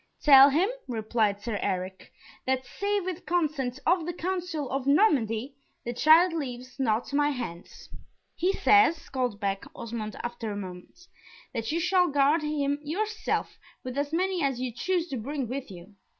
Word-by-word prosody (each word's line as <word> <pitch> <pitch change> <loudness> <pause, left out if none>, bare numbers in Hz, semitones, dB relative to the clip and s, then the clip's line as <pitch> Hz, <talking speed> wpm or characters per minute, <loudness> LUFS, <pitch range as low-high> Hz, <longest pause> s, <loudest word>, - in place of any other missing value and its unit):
"Tell 275 -1 +9
him," 325 +8 +2 0.2
replied 220 -3 0
Sir 220 -4 -3
Eric, 185 -1 -3 0.4
"that 260 0 0
save 400 +8 -2
with 370 -1 -4
consent 300 -7 0
of 345 -1 +2
the 350 - -2
council 350 -4 -3
of 270 0 -2
Normandy, 270 - +2 0.3
the 240 - -3
child 320 +7 +5
leaves 255 -4 -6
not 235 +1 0
my 290 +1 +3
hands." 230 -11 -7 0.5
"He 360 +3 +1
says," 395 -5 +3
called 250 -6 -2
back 195 -2 -2
Osmond, 220 -2 -5
after 240 -2 -4
a 205 - -4
moment, 185 - -9 0.5
"that 230 0 -3
you 330 - 0
shall 360 +1 +3
guard 290 +2 +3
him 290 -1 -1
yourself, 420 +9 -2 0.2
with 255 0 -6
as 285 +1 -1
many 365 +2 0
as 270 -4 0
you 255 -1 -2
choose 350 +7 -1
to 270 - -3
bring 270 +3 -3
with 260 +2 -5
you. 185 +2 -12
275 Hz, 165 wpm, -27 LUFS, 235-335 Hz, 0.5 s, Tell